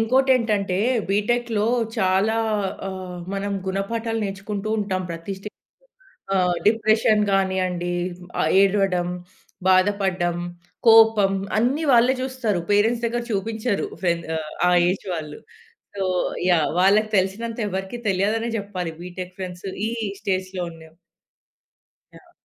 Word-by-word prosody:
ఇంకోటేంటంటే 225 -6 +2 0.3
బీటెక్‌లో 220 +1 +1 0.3
చాలా 195 +3 +2 0.5
ఆహ్, 185 -2 -6 0.2
మనం 200 +1 -2
గుణపాఠాలు 225 +4 -2
నేర్చుకుంటూ 200 +1 -4
ఉంటాం 190 -2 -1
ప్రతి 165 +3 -5
స్టే 195 - -7 0.9
ఆహ్, 180 -2 +2
డిప్రెషన్ 220 0 +3
గానీయండి 185 -2 0 0.5
ఆహ్, 155 - +2
ఏడవడం, 195 -3 +2 0.6
బాధపడ్డం, 185 -2 +2 0.5
కోపం 225 -3 +6 0.3
అన్నీ 255 +8 +1
వాళ్ళే 245 +2 +5
జూస్తారు. 255 -8 -1
పేరెంట్స్ 225 +4 +3
దగ్గర 240 +1 -2
చూపించరు. 220 +2 -1 0.2
ఫ్రెండ్ 170 -2 0
ఆహ్, 155 -1 -5 0.2
ఆ - - +4 0.2
ఏజ్ 195 - -4
వాళ్ళు. 150 -2 -6 0.6
So 195 - -2 0.5
yeah! 165 -3 +3
వాళ్ళకి 210 +3 +4
తెలిసినంత 225 +5 -2
ఎవరికీ 190 +4 -4
తెలియదనే 215 +5 0
జెప్పాలి. 185 -4 -4
బీటెక్ 180 0 -8
ఫ్రెండ్స్ 180 0 -6 0.2
ఈ - - -2 0.3
స్టేజ్‌లో 185 -2 -2
ఉన్న 160 -1 -14 1.3
యాహ్! 345 -2 -19
195 Hz, 110 wpm, -23 LUFS, 185-225 Hz, 1.3 s, కోపం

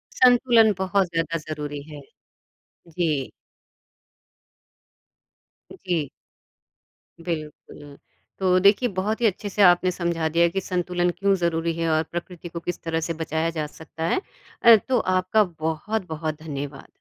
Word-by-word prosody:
संतुलन 245 -3 +5
बहुत 190 0 +1
ज़्यादा 165 0 -1
ज़रूरी 145 -2 -5
है, 145 -1 -9 0.9
जी। 155 -5 -1 2.4
जी। 170 -7 -2 1.1
बिल्कुल, 150 -3 -7 0.4
तो 185 -1 +3
देखिए 200 +6 +4
बहुत 215 +5 -1
ही - - +3
अच्छे 205 +1 -3
से 205 - -1
आपने 180 0 +5
समझा 170 -2 -1
दिया 170 +2 +3
कि 195 +3 -2
संतुलन 180 -1 -1
क्यों 200 0 +2
ज़रूरी 170 -2 0
है 165 0 -1
और 155 0 +2
प्रकृति 175 0 -6
को 170 - -6
किस 175 +1 -5
तरह 165 -1 -1
से 165 - -2
बचाया 160 +1 -1
जा 150 - -1
सकता 160 +1 -9
है। 375 - +1 0.4
अ, 235 -1 +10
तो 250 +4 0
आपका 185 +3 +2
बहुत-बहुत 160 -1 -4
धन्यवाद। 140 -2 -6
170 Hz, 130 wpm, -24 LUFS, 160-190 Hz, 2.4 s, अ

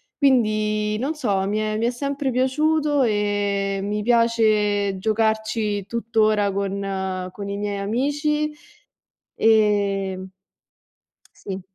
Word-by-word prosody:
quindi 215 -5 +2
non 290 +5 -2
so, 200 -9 0
mi 210 +1 -1
è 215 0 -1
mi 230 - 0
è - - +2
sempre 280 +2 -2
piaciuto 290 +3 +1
e 205 -3 0
mi 210 +1 -2
piace 215 -4 +2
giocarci 220 -1 0
tuttora 215 -3 +1
con 190 -1 -3
con 200 +1 -7
i 200 - -3
miei 205 -1 -3
amici. 290 +8 0 0.9
Ehm 200 -4 +2 1.2
Sì. 190 -1 -4
215 Hz, 105 wpm, -22 LUFS, 200-235 Hz, 1.2 s, quindi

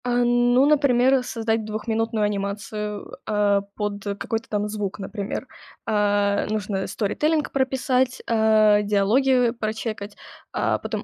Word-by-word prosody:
А, 245 0 +2
ну, 245 +2 +4
например, 270 -3 +3
создать 225 -2 -1
двухминутную 220 +1 -2
анимацию, 210 +1 -3
э, - - -10
а, 205 -1 +2
под 205 -1 -3
какой-то 225 +1 -4
там 210 0 -1
звук, 210 -2 -4
например. 200 +1 -5 0.4
А, 205 -1 +1
нужно 205 -2 -2
storytelling 300 +9 0
прописать, 260 -1 0
а, 215 -2 +4
диалоги 235 +5 +3
прочекать, 215 -2 -4 0.4
а, - - 0
потом - - -4
220 Hz, 120 wpm, -23 LUFS, 205-245 Hz, 0.4 s, ну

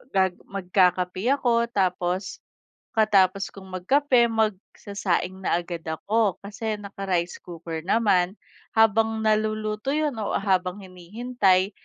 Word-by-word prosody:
gag 190 -1 +2
magkakape 185 +1 +1
ako 235 -3 +1
tapos, 185 -3 -1 0.6
pagkatapos 195 -3 +3
kung 190 -1 -11
magkape, 245 +6 +3
magsasaing 200 -3 -2
na - - +2
agad 170 -1 -6
ako, 205 +5 0
kasi 215 +2 -4
naka-rice 195 -4 -3
cooker 165 -2 -6
naman. 195 -3 +2 0.4
Habang 225 0 +3
naluluto 215 +2 0
yun 305 -1 +1
o 210 - -2
habang 185 -1 0
hinihintay, 190 +1 0
195 Hz, 105 wpm, -25 LUFS, 185-220 Hz, 0.6 s, pagkatapos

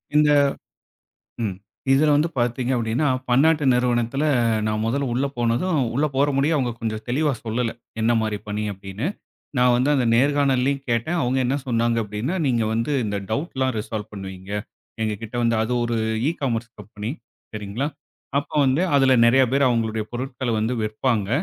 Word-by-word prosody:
இந்த 150 0 +5 1.2
ம். 95 -3 -2 0.4
இதுல 150 +3 +4
வந்து 155 +3 +2
பார்த்தீங்க 120 +2 0
அப்படின்னா, 115 +6 0 0.2
பன்னாட்டு 150 +4 +4
நிறுவனத்துல 125 +3 +1 0.4
நான் 110 0 -1
முதல்ல 140 +4 0
உள்ள 135 +3 +1
போனதும் 120 +9 +1 0.2
உள்ள 150 +3 +2
போற 140 +2 +4
முடியும்னு 150 +3 +2
அவங்க 125 -3 0
கொஞ்சம் 110 -1 -3
தெளிவா 145 +3 +1
சொல்லல. 115 +1 -1 0.3
என்ன 115 +2 +3
மாரி 110 -2 -1
பணி 105 +1 -2
அப்டின்னு. 95 +7 -5 0.5
நான் 125 0 +5
வந்து 130 +4 +2
அந்த 125 -4 +2
நேர்காணல்லையும் 140 0 +2
கேட்டன். 140 +10 0
அவங்க 125 +2 +1
என்ன 135 +3 +1
சொன்னாங்க? 115 -1 +1
அப்டின்னா, 105 - -3
நீங்க 120 -3 +2
வந்து 115 +6 -1
இந்த 100 -1 -2
டவுட்லாம் 130 -1 -1
ரிசால்வ் 105 0 -5
பண்ணுவீங்க. 95 -1 -8 0.5
எங்ககிட்ட 110 +2 -4
வந்து 115 -1 +2
அது 120 +3 -2
ஒரு 120 -1 -1 0.3
இ-காமர்ஸ் 120 -8 -2
கம்பெனி 105 +2 -6 0.4
சரிங்களா? 105 +6 -3 0.5
அப்ப 145 - -5
வந்து, 130 +5 +2 0.2
அதுல 135 -1 +5
நெறைய 130 +3 +5
பேர் 140 -1 +4
அவங்களுடைய 110 -2 0
பொருட்கள்ல 125 -1 -3
வந்து 110 +3 0
விற்ப்பாங்க. 110 -1 0
120 Hz, 150 wpm, -23 LUFS, 110-135 Hz, 1.2 s, இந்த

